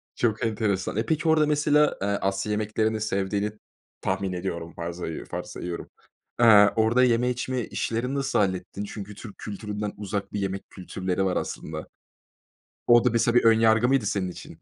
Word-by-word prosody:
Çok 115 -1 0
enteresan. 105 -3 -1
Eee, 110 - 0
peki, 160 0 0
orada 155 -1 +4
mesela, 150 0 +3
eee, 100 - 0
Asya 100 0 -1
yemeklerini 110 +1 0
sevdiğini 100 0 -1 0.5
tahmin 95 -2 -1
ediyorum. 85 -2 -4
Farzayı 85 -1 -5
varsayıyorum, 85 -1 -5 0.5
Eee, 105 -3 +8
orada 115 +3 +3
yeme 125 0 +3
içme 125 +1 -2
işlerini 125 +4 -2
nasıl 135 -3 0
hallettin? 95 0 -1
Çünkü 105 0 -7
Türk 105 -2 -10
kültüründen 105 0 -5
uzak 100 0 -4
bir 105 - -1
yemek 95 0 -4
kültürleri 95 0 -3
var 90 - 0
aslında. 80 0 -5 1.0
O 120 0 +6
da - - +5
mesela 115 +1 +1
bir 120 - +5
ön 110 0 +6
yargı 115 +1 +4
mıydı 135 -5 +2
senin 95 -2 -1
için? - - -12
105 Hz, 160 wpm, -26 LUFS, 95-120 Hz, 1.0 s, Eee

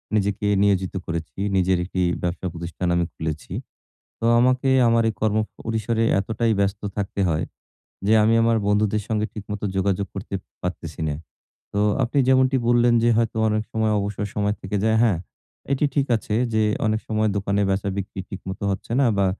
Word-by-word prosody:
নিজেকে 100 0 0 0.2
নিয়োজিত 95 -2 +1
করেছি। 85 +1 -5 0.2
নিজের 95 0 +3
১ 90 - -8
টি 90 - +2 0.2
ব্যবসা 90 +1 -2
প্রতিষ্ঠান 85 +1 -4
আমি 85 -1 +2
খুলেছি। 80 -1 -5 0.7
তো - - -2
আমাকে 130 +2 +3 0.2
আমার 115 0 +4
এই - - -3
কর্ম 110 0 +2 0.2
পরিসরে 115 0 -1 0.2
এতটাই 110 +3 0
ব্যস্ত 100 0 0 0.2
থাকতে 100 0 -2
হয়। 80 +1 0 0.6
যে 110 - +4
আমি 110 - +4
আমার 115 0 +3
বন্ধুদের 105 0 +1
সঙ্গে 110 -1 0
ঠিকমতো 105 -1 -5
যোগাযোগ 100 +1 0
করতে 95 0 -5 0.3
পারতেছি 80 -4 -5
না। 75 - -1 0.6
তো 100 - 0 0.2
আপনি 130 +4 -2
যেমনটি 130 0 +4
বললেন 120 0 +4
যে 120 - +4
হয়তো 115 -1 0
অনেক 110 0 +1
সময় 110 -1 +1
অবসর 100 0 -3
সময় 105 0 0
থেকে 105 +2 -2
যায়, 110 0 +3
হ্যাঁ। 100 -8 +2 0.5
এটি 140 +2 +2
ঠিক 140 -1 +2
আছে 105 0 -3 0.2
যে, 110 0 +3 0.2
অনেক 110 0 +1
সময় 110 -1 +1
দোকানে 100 +1 0
বেচা-বিক্রি 95 0 -2
ঠিক 95 - -6
মতো 95 - -6
হচ্ছে 95 +3 -5
না 135 - +4
বা 100 - +3
105 Hz, 175 wpm, -23 LUFS, 95-110 Hz, 0.7 s, আমার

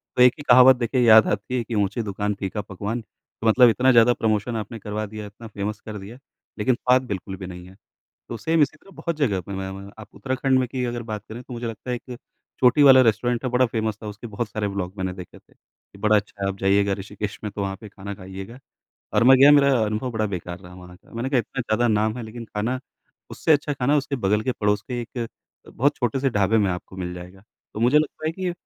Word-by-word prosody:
तो - - +2
एक 125 0 +7
ही 145 - -8
कहावत 130 +1 +8
देखिए 125 +1 0
याद 110 -2 +7
आती 105 +5 -2
है 120 - -1
कि 115 +1 -5
ऊँची 105 +2 0
दुकान 105 0 -2
फीका 100 +2 -3
पकवान। 105 +4 -5
तो 110 +1 -9
मतलब 120 +2 +7
इतना 130 +3 +3
ज़्यादा 120 0 +6
प्रमोशन 110 0 -1
आपने 110 +1 -5
करवा 105 +1 -4
दिया, 105 0 -8
इतना 110 +3 -12
फ़ेमस 105 0 -4
कर 105 -1 -6
दिया 105 +5 -10 0.4
लेकिन 120 +4 +2
स्वाद 125 +1 +3
बिल्कुल 95 -2 -5
भी 95 - -7
नहीं 90 0 -9
है। 95 - -15 0.5
तो 115 - -5
सेम 160 +8 +2
इसी 145 +2 0
तरह 195 - -19
बहुत 170 -2 -3
जगह 115 -11 +1
पे 95 +3 -9
मै 95 0 -4
मै 100 +1 -9
आप 110 - -10
उत्तराखंड 130 0 0
में 130 - +1
की 125 +1 -3
अगर 120 -1 -3
बात 110 -2 -6
करें 115 +3 -8
तो 125 - -12
मुझे 120 0 -5
लगता 115 +2 -6
है 125 - -1
कि 125 - -11
एक 120 - -8 0.4
चोटी 125 +3 +5
वाला 135 -2 +8
रेस्टोरेंट 120 +2 +1
है 130 - -1
बड़ा 125 +1 +3
फ़ेमस 110 -2 -2
था। - - -6
उसके 105 +3 -8
बहुत 110 +1 -4
सारे 105 0 -3
व्लॉग 100 -2 -3
मैंने 95 -1 -2
देखे 90 -2 -11
थे। - - -29
कि - - -24
बड़ा 105 +1 +3
अच्छा 105 -1 -4
है, - - +1
आप 95 - -4
जाइएगा 100 +1 +2
ऋषिकेश 105 +1 -6
में 105 - -3
तो 100 - -6
वहाँ 95 0 -3
पे 105 - -10
खाना 100 0 -8
खाइएगा। 95 +5 -9 0.6
और - - +4
मैं 130 +2 +8
गया 140 +2 +8
मेरा 140 -1 +5 0.2
अनुभव 110 +4 -2
बड़ा 110 -2 -1
बेकार 90 -3 -5
रहा 90 -1 -13
वहाँ 90 0 -13
का। 95 - -25
मैंने 120 +3 -3
कहा 135 - +3
इतना 125 +3 -3
ज़्यादा 120 +1 +1
नाम 110 +1 +1
है 125 - -5
लेकिन 115 +2 -8
खाना 115 +5 -1 0.5
उससे 160 - +1
अच्छा 145 0 +1
खाना 140 +1 +1
उसके 140 -1 -1
बगल 105 -2 +1
के 130 - 0
पड़ोस 105 -2 0
के 120 -1 -2
एक 120 0 -5 0.4
बहुत 140 +4 0
छोटे 125 +1 -1
से 135 0 +1
ढाबे 105 0 +2
में 100 -3 +2
आपको 90 +1 -6
मिल 90 -1 -4
जाएगा। 90 +2 -11 0.3
तो 105 - -5
मुझे 125 +6 +5
लगता 155 +1 -3
है 160 - 0
कि 185 0 -3
110 Hz, 250 wpm, -23 LUFS, 100-125 Hz, 0.6 s, कहावत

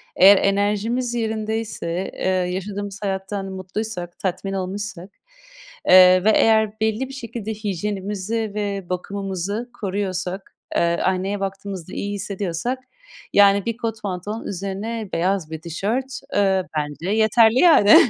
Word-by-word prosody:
Eğer 195 +2 +8
enerjimiz 210 +5 +1
yerindeyse, 220 -5 -2
eee, - - -10
yaşadığımız 190 +2 -2
hayattan 195 0 -3
mutluysak, 190 -1 -5
tatmin 195 +1 -2
olmuşsak, 195 0 -4 0.8
eee, 185 0 +8
ve 220 - +5
eğer 220 -1 +3
belli 220 +4 0
bir - - -9
şekilde 230 -4 -5
hijyenimizi 205 +1 -3
ve 200 -3 -3
bakımımızı 195 +4 -3
koruyorsak, 190 -1 -3 0.2
eee, - - +3 0.2
aynaya 190 +2 0
baktığımızda 195 -2 -5
iyi 205 0 -3
hissediyorsak, 200 +4 -3 0.5
yani, 200 -1 +5
bir 230 -1 -2
kot 225 -2 -4
pantolon, 205 +3 -4
üzerine 200 +3 -4
beyaz 175 -1 0
bir 160 - -5
tişört, 220 - -2 0.2
eee, 195 -2 +3
bence 150 +4 -3
yeterli 220 +2 +5
yani. 310 - +7
200 Hz, 120 wpm, -22 LUFS, 185-220 Hz, 0.8 s, Eğer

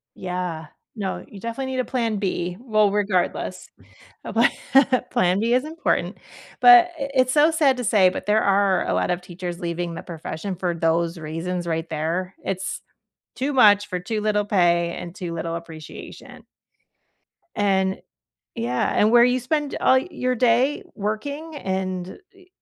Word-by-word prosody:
Yeah. 180 -4 -4 0.3
No, 195 -3 -4
you 200 - -12
definitely 245 +5 -4
need 255 - -2
a 250 - 0
plan 230 -4 -1
B, 180 -3 -2
well, 215 -4 +2
regardless, 200 -3 -1 0.6
a - - -6
pla - - +4 0.6
plan 190 -6 +2
B 230 +2 +1
is 255 +4 +1
important, 325 +3 -1 0.4
but 360 -1 +8
it 275 0 -3
it's 255 0 +3
so 305 +2 +5
sad 290 -5 +2
to 250 - -3
say, 205 -5 +4
but 190 - -6
there 215 +1 +3
are 200 -1 +2
a - - 0
lot - - 0
of 175 - 0
teachers 175 -1 -7
leaving 170 0 -3
the - - -7
profession 170 +2 -6
for 175 -1 -2
those 165 +1 0
reasons 165 +3 -4
right 165 0 -3
there, 165 +4 -3
it's, 190 0 -4 0.6
too 280 +3 -1
much 205 -5 +5
for 180 -2 -3
too 215 +4 -3
little 210 -1 +1
pay 175 -4 +2
and 175 -1 -7
too 175 -2 -6
little 165 0 -3
appreciation 160 -2 -11 1.1
and, 190 -2 +1 0.5
yeah, 120 +2 -1
and 215 +2 +4
where 240 0 +7
you 250 +1 +3
spend 295 +3 -2
all 260 - +5
your 255 -3 -2
day 250 +4 +2
working 285 +10 -4
and 190 -5 -4
e 375 -2 -21
195 Hz, 160 wpm, -23 LUFS, 175-245 Hz, 1.1 s, but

